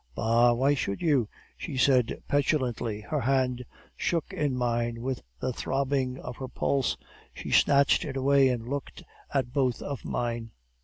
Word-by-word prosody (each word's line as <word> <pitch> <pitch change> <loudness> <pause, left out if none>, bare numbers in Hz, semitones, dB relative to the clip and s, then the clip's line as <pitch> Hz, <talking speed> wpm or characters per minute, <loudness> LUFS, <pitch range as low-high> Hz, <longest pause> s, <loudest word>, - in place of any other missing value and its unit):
"'Bah! 115 +2 +4
why 135 +4 +3
should 100 -8 -2
you?' 140 -10 +2 0.3
she 145 -5 -6
said 125 -3 +2
petulantly. 125 -7 0
Her - - -2
hand 125 0 +1 0.3
shook 165 -3 -1
in 145 -4 0
mine 120 -1 -1
with 130 0 -2 0.2
the 130 0 -2
throbbing 135 0 -1
of 125 -2 -8
her 130 - -5
pulse; 135 +1 0 0.4
she - - -6
snatched 140 0 +4
it 135 - -4
away, 135 0 +4
and 120 -2 -2
looked 140 +1 -5 0.3
at 130 -3 -1
both 130 -4 +1
of 140 -4 -5
mine. 115 -1 -3
130 Hz, 155 wpm, -28 LUFS, 120-140 Hz, 0.4 s, Bah